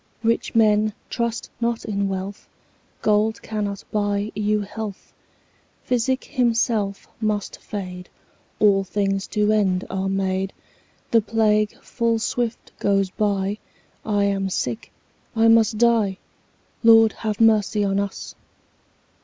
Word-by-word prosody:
Rich 230 +1 0
men, 215 -1 +4 0.2
trust 235 -1 -2
not 235 -1 -1
in 200 -2 -1
wealth, 195 +1 -5 0.6
Gold 215 +1 +2
cannot 205 -2 -3
buy 205 0 0
you 210 0 0
health; 205 0 -7 0.7
Physic 255 +1 0
himself 230 -6 0
must 210 -2 -2
fade; 180 -3 -6 0.5
10 215 - +6
All 195 -1 +3
things 195 0 -1
to 210 0 +1
end 195 -3 +1
are 190 0 -1
made; 190 0 -1 0.6
The 230 - +5
plague 215 -1 +1
full 230 -2 0
swift 235 +1 -2
goes 195 -2 +1
by; 200 0 -1 0.4
I 205 -2 +1
am 195 -1 0
sick, 120 -10 -3 0.4
I 225 0 +4
must 225 -1 +4
die— 225 -4 +3 0.7
Lord, 225 -1 +7
have 215 -1 -3
mercy 215 -2 +3
on 195 0 +1
us! 200 -1 -4
210 Hz, 120 wpm, -23 LUFS, 195-225 Hz, 0.7 s, Lord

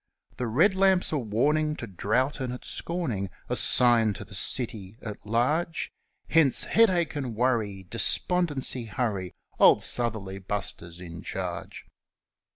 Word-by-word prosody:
The 125 - -2
red 160 - +3
lamp's 190 -1 +2
a 150 - 0
warning 150 +7 0
to 120 - -6
drought 115 - -1
and 130 -2 -3
its 125 - -7
scorning 125 - -3 0.2
A - - 0
sign 115 -3 +4
to - - -8
the - - -14
city 110 -4 -1
at 105 -3 -8
large 150 +10 0 0.4
Hence, 155 -5 +5
Headache 185 -9 +2
and 130 -6 -4
Worry! 110 -5 0
Despondency, 135 - +1
hurry! 105 -5 -3 0.2
Old - - +6
Southerly 110 -5 0
Buster's 90 -3 -5
in 85 -2 -9
charge. - - -6
120 Hz, 135 wpm, -27 LUFS, 105-150 Hz, 0.4 s, Old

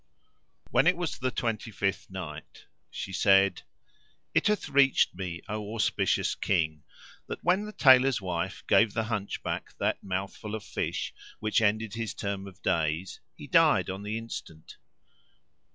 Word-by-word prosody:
When 145 - +4
it 180 -1 +4
was 175 -2 -3
the 130 - 0
Twenty 115 -3 -2
fifth 100 -2 -2
Night, 80 -6 -8 0.2
She 95 - -6
said, 95 -1 +4 0.7
It - - +3
hath 210 -1 +1
reached 140 -1 +4
me, 90 -2 -5
O 105 +1 -4
auspicious 105 - +1
King, 80 -5 0 0.5
that - - -6
when 185 +4 +2
the - - -6
Tailor's 130 - +6
wife 95 0 -3
gave 110 -2 +4
the 110 - +1
Hunchback 110 -3 -4
that - - 0
mouthful 100 +3 -4
of 110 - -6
fish - - -3 0.3
which 110 +1 +1
ended 110 0 +1
his 115 -1 -4
term 100 -1 -4
of 95 -2 -14
days 85 0 0 0.2
he - - -10
died - - +4
on 95 +1 -6
the 105 +2 -3
instant. 95 -8 -8
100 Hz, 150 wpm, -28 LUFS, 95-115 Hz, 0.7 s, Tailor's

